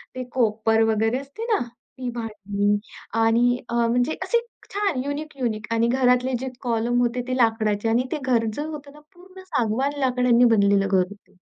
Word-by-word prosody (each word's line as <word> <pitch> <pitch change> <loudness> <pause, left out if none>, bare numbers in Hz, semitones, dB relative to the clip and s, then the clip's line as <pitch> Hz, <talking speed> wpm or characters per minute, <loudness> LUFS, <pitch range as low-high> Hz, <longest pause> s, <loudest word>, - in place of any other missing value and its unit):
ते 255 - -3
कोपर 225 -2 +2
वगैरे 225 +3 +1
असते 280 +11 -9
ना, - - +3 0.4
ती 255 -1 -4
भांडी 205 -3 -1 0.4
आणि 235 +2 +3
अ, - - -5
म्हणजे 245 +5 +1
असे 470 - +2 0.3
छान 395 -10 0
युनिक-युनिक 275 -7 -3
आणि 230 +1 +2
घरातले 250 +1 +2
जे 265 - -4
कॉलम 240 0 0
होते 245 +1 0
ते 255 - -1
लाकडाचे 225 -2 +1
आणि 235 +3 +2
ते 315 - 0
घर 240 -3 +2
जे 290 - -4
होतं 300 -2 -7
ना, 300 - -15 0.2
पूर्ण 370 +1 -14
सागवान 275 -2 -1
लाकडांनी 250 -2 +3
बनलेलं 200 -3 +4
घर 195 0 +2
होतं. 205 -1 -16
245 Hz, 165 wpm, -23 LUFS, 225-265 Hz, 0.4 s, बनलेलं